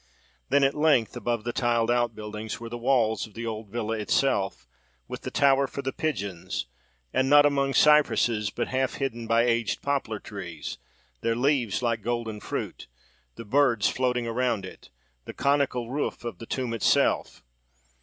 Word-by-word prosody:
Then, 140 - +4
at 135 +1 +3
length, 150 -7 +2
above 120 -2 -2
the 120 +1 -3
tiled 120 -1 +1
outbuildings, 110 -3 -2
were 115 0 -7
the 120 - -5
walls 115 -3 +1
of 105 - -21
the 115 +1 -5
old 110 -2 -5
villa 110 0 -2
itself, 105 - 0 0.4
with - - -7
the - - -5
tower 140 -1 +3
for 140 - -6
the 135 - -2
pigeons; 100 - -3 0.5
and, 130 0 +2
not 145 0 +7
among 140 -1 +1
cypresses, 120 -8 +4
but - - -3
half 130 0 0
hidden 120 -4 -3
by 115 +1 +4
aged 115 -2 0
poplar 140 -6 -1
trees, 85 -8 -7 0.4
their 115 - 0
leaves 125 -4 +1
like 115 -2 0
golden 115 -1 -3
fruit, - - -5 0.5
the 115 - -9
birds 120 -2 +3
floating 125 -2 0
around 115 -3 -1
it, 95 - -12 0.4
the - - -7
conical 140 -4 +1
roof 145 -2 -2
of 120 - -6
the 115 - -9
tomb 125 -3 -2
itself. 115 - +1
120 Hz, 165 wpm, -26 LUFS, 110-135 Hz, 0.5 s, not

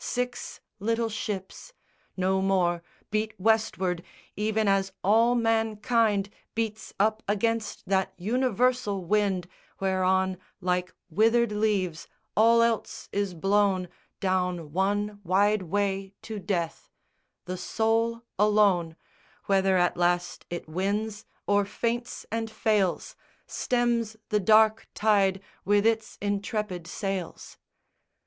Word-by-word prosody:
Six 245 0 -3 0.2
little 230 +2 0
ships, 210 - -5 0.4
No 190 +1 +1
more, 180 -3 +2 0.3
beat 215 0 -2
Westward, 190 -4 +1 0.3
even 215 +1 0
as 195 -1 +2
all 230 +5 +4
mankind 225 -2 +1 0.2
Beats 220 -1 -3
up 215 +2 +2
against 225 +2 -1
that 190 0 +1
universal 245 -1 0
wind 195 -2 +1 0.3
Whereon 190 -1 +1 0.2
like 180 0 -1 0.2
withered 225 +5 +3
leaves 205 -6 0 0.3
all 230 +2 +6
else 230 -1 -1
is 200 -3 -1
blown 195 0 +2 0.3
Down 180 -5 -1
one 205 +2 0
wide 200 +3 +3
way 195 +1 -2
to 220 -2 -5
death: 175 -5 -3 0.6
the 180 - -4
soul 225 +5 0 0.2
alone, 200 -6 +3 0.5
Whether 195 -1 +3
at 175 -1 +2
last 175 0 0
it 175 -1 -5
wins, 205 +5 -2 0.2
or 205 0 +3
faints 235 +4 -3
and 225 0 -2
fails, 215 -4 0 0.3
Stems 235 -3 0
the 210 - +2
dark 220 +2 +4
tide 195 -3 +2 0.2
with 205 +1 +3
its 225 -1 0
intrepid 205 -3 -2
sails. 195 -2 -5
205 Hz, 110 wpm, -27 LUFS, 190-220 Hz, 0.6 s, all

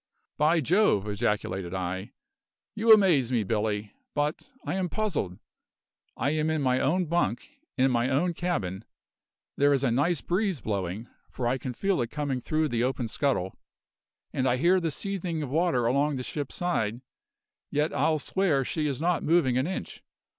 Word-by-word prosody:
"By 155 +2 +4
Jove!" 150 - +3
ejaculated 100 -4 -2
I, 95 +2 -4 0.6
"you 225 +1 +3
amaze 175 - +6
me, 120 -4 +2
Billy. 105 0 -1 0.2
But 150 - -2
I - - -2
am 185 -1 -1
puzzled. 165 - -2 0.8
I 135 +5 +1
am 155 0 0
in 155 -2 0
my 130 -1 +2
own 180 +8 +1
bunk, 155 - 0 0.3
in 130 0 +3
my 120 +1 +1
own 170 +7 +1
cabin; 110 - -2 0.7
there 145 +1 +4
is 140 -1 +2
a 130 - +2
nice 145 +7 +2
breeze 190 -2 0
blowing, 100 0 -3 0.2
for 120 - -3
I 130 +2 0
can 130 -1 -4
feel 195 -3 +1
it 115 - -2
coming 145 -4 -2
through 155 +4 0
the 120 -2 0
open 125 -2 -1
scuttle, 110 -8 -1 0.7
and 130 - 0
I 125 - +2
hear 180 +7 +4
the 165 -2 -1
seething 175 -1 -3
of 135 - -6
water 160 -6 +2
along 140 +4 +2
the 130 - -4
ship's 145 +1 -5
side, 120 -10 -1 0.7
yet 150 +2 0
I'll 160 -1 +2
swear 155 -3 0
she 155 +3 -1
is 140 -1 -3
not 175 0 +1
moving 155 -6 +3
an 130 +4 +1
inch. 190 - -6
140 Hz, 170 wpm, -27 LUFS, 120-170 Hz, 0.8 s, amaze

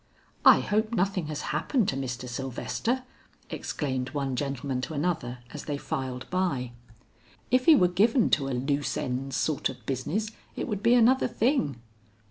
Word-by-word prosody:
"I - - +8
hope 215 +2 0
nothing 190 -4 0
has 150 -1 -4
happened 245 -8 +1
to - - -1
Mr. 130 -2 -4
Sylvester," 135 - -2 0.5
exclaimed 130 -3 -3
one 135 -2 -1
gentleman 135 -1 -2
to 155 +4 -5
another 140 -6 -2
as 150 - -7
they 145 -2 -2
filed 130 -2 -4
by. 150 -10 0 0.8
"If 255 0 +3
he 325 - +9
were 180 - +5
given 215 +7 +3
to 140 -3 +2
a 130 -2 -1
loose 140 +3 -1
ends' 135 -2 -3
sort 155 -3 0
of - - -10
business 155 - -2 0.2
it - - -3
would 205 -5 -3
be 235 +2 +5
another 250 +2 +5
thing." 220 - 0
145 Hz, 160 wpm, -28 LUFS, 130-210 Hz, 0.8 s, he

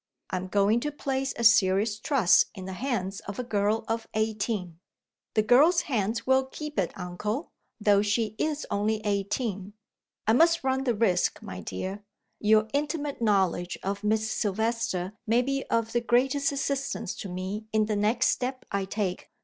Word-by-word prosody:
I 185 - 0
am 185 +1 -4
going 205 +4 +3
to 295 +4 -3
place 270 -2 -2
a 235 - -2
serious 210 0 +4
trust 225 - +4
in 190 -2 -7
the 190 - -5
hands 195 -4 -2
of 200 - -5
a 250 - -2
girl 210 -1 0
of 225 0 -2
eighteen." 210 -5 -2 0.6
"The 215 - +4
girl's 300 +10 +5
hands 225 -4 -1
will 265 0 +3
keep 300 -2 -5
it, 180 - 0
uncle 210 - -4 0.3
though 205 -1 +4
she 210 +1 0
is 300 -1 -1
only 210 +1 0
eighteen." 200 0 -2 0.5
"I 220 - +4
must 330 +5 +4
run 265 0 0
the 240 -3 +1
risk, 200 -5 +1
my 90 - -7
dear; 190 - -5 0.4
your 215 0 +4
intimate 290 -1 -2
knowledge 190 -5 +1
of 200 +2 -3
Miss 215 +1 +1
Silvester 215 -2 -1
may 235 +3 +3
be 275 +1 -2
of 230 -1 0
the 240 - +1
greatest 270 +5 +2
assistance 275 -6 -2
to 200 - -6
me 185 +4 -4
in 215 -1 +2
the 210 0 -1
next 210 +3 +2
step 255 +1 -2
I 200 -1 -1
take. 195 -2 -3
220 Hz, 170 wpm, -27 LUFS, 200-255 Hz, 0.6 s, girl's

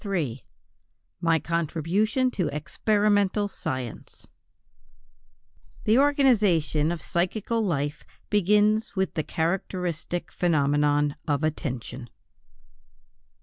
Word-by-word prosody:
III 160 - -2 0.8
MY 165 -1 +3
CONTRIBUTION 170 - 0
TO 180 -8 -1
EXPERIMENTAL 205 +5 +1
SCIENCE 130 - -6 1.6
=The 220 +4 +4
organization 210 - +3
of 175 - -3
psychical 210 +6 -1
life 150 -6 -2 0.3
begins 210 +2 +3
with 190 -1 0
the 155 - 0
characteristic 175 +1 -3
phenomenon 145 -3 +2
of 145 0 0
attention=. 125 -5 -4
170 Hz, 80 wpm, -26 LUFS, 150-210 Hz, 1.6 s, =The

